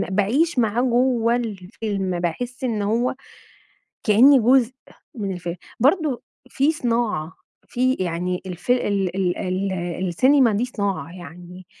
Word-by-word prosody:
باعيش 255 - +1
معاه 230 +1 +2
جوّه 240 -2 +2
الفيلم، 195 -4 -3
باحس 245 +10 -4
إن 220 -4 -1
هو 235 +5 0 0.9
كأني 250 +6 +6
جزء 250 +1 +4 0.4
من 200 -4 -3
الفيلم. 175 -1 -5 0.2
برضه 290 -1 +2 0.3
في 280 +4 +2
صناعة، 230 - -1 0.4
في 255 +1 +1
يعني 180 -1 -2
الف 180 +6 -6
ال 200 -7 +1
ال 180 -2 0
ال 190 +1 -2 0.4
السينما 255 - +4
دي 210 +4 0
صناعة، 200 -7 -3
يعني 175 +2 -11
215 Hz, 120 wpm, -22 LUFS, 185-250 Hz, 0.9 s, كأني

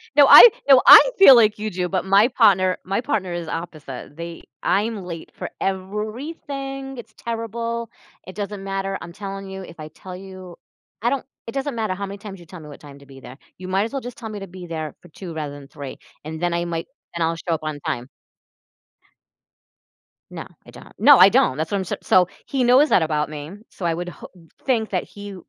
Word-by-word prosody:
No, 285 -2 +7
I 480 - +12 0.2
no, 265 -2 +8
I - - +12 0.2
feel 275 -10 +9
like 215 -3 +4
you 215 0 -3
do, 180 -1 -3
but 190 -1 -2
my 200 +4 +5
partner 195 -7 +3
my 195 +5 -2
partner 200 -7 -2
is 170 -1 -5
opposite. 155 -5 -7
They 170 0 -8 0.2
I'm 210 -1 0
late 170 -2 -8
for - - -7
everything, 270 - -5
it's 220 -2 -11
terrible. 230 0 -4 0.4
It 185 - -10
doesn't 205 -1 -5
matter, 195 0 -3
I'm 170 0 -9
telling 195 -1 -7
you 190 0 -7
if 170 -2 -13
I 155 - -7
tell 180 +4 -11
you 185 -1 -11 0.5
I 235 - +1
don't 275 - -2 0.2
it 230 - -6
doesn't 275 -1 -3
matter 220 -4 -2
how 200 +1 -5
many 200 +1 -8
times 200 -2 -10
you 175 - -14
tell 180 +1 -11
me 150 - -12
what 145 - -12
time 140 -1 -14
to 140 - -17
be 135 -1 -14
there. 130 +1 -12 0.2
You 185 0 -9
might 190 +2 +1
as 230 - -7
well 275 - -3
just 245 -1 -9
tell 220 - -7
me 210 -1 -7
to 195 - -8
be 180 0 -11
there 155 -3 -5
for - - -17
2:00 175 +1 -9
rather 150 -3 -5
than 140 -1 -13
3:00, 140 -3 -9 0.3
and 160 +2 -7
then 175 -1 0
I 170 0 -1
might 165 -1 -4 0.3
then 170 -1 0
I'll 165 +1 -1
show 165 +1 -3
up - - -8
on 155 -1 -4
time. 120 +1 -3 2.2
No, - - -7 0.2
I - - -14
don't. - - -14
No, - - +7
I - - +9
don't, 130 - +2
that's 155 +1 -3
what 200 - 0
I'm 190 - -2
so - - -4
so 180 -1 +4 0.2
he 265 -2 -1
knows 255 +5 +5
that - - +4
about 150 -1 -1
me, 150 +1 -8 0.2
so 180 - -8
I 170 - +1
would 175 +2 -5
ho - - -12 0.4
think 230 -6 0
that 185 - -1
he 205 -1 -10
190 Hz, 225 wpm, -22 LUFS, 165-220 Hz, 2.2 s, I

